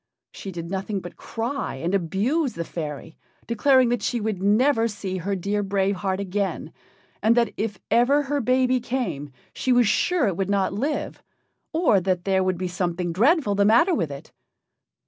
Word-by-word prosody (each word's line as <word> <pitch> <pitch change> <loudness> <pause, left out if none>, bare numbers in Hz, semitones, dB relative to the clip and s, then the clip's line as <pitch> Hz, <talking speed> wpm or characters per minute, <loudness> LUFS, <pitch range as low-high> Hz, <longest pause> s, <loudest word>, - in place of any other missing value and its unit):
She 195 - -8
did 170 -1 -7
nothing 195 +1 -2
but 175 -1 -10
cry 240 - -4
and 165 +7 -3
abuse 215 - 0
the 170 - -4
fairy, 160 -1 -6 0.3
declaring 255 +2 +3
that 240 0 0
she 240 - -1
would 210 -3 -3
never 225 +4 +3
see 200 -3 -5
her 195 +3 -2
dear 200 +3 -1
Brave 195 0 0
Heart 190 0 -2
again, 195 -4 -3 0.5
and 225 +3 +3
that 235 -3 +2
if 210 -1 -3
ever 250 +6 +4
her 285 0 -1
baby 255 +1 +2
came 195 - -3 0.2
she 260 - -1
was 245 -2 +4
sure 350 - +2
it 185 -4 -2
would 195 -1 -1
not 200 -1 +1
live, 275 +9 -3 0.5
or 315 - +3
that 185 -1 -1
there 190 -1 +2
would 185 -1 0
be 185 +1 -2
something 175 -1 -2
dreadful 250 - +3
the 200 0 +2
matter 235 - +4
with 170 - 0
it. 140 -1 -9
200 Hz, 180 wpm, -24 LUFS, 185-245 Hz, 0.5 s, ever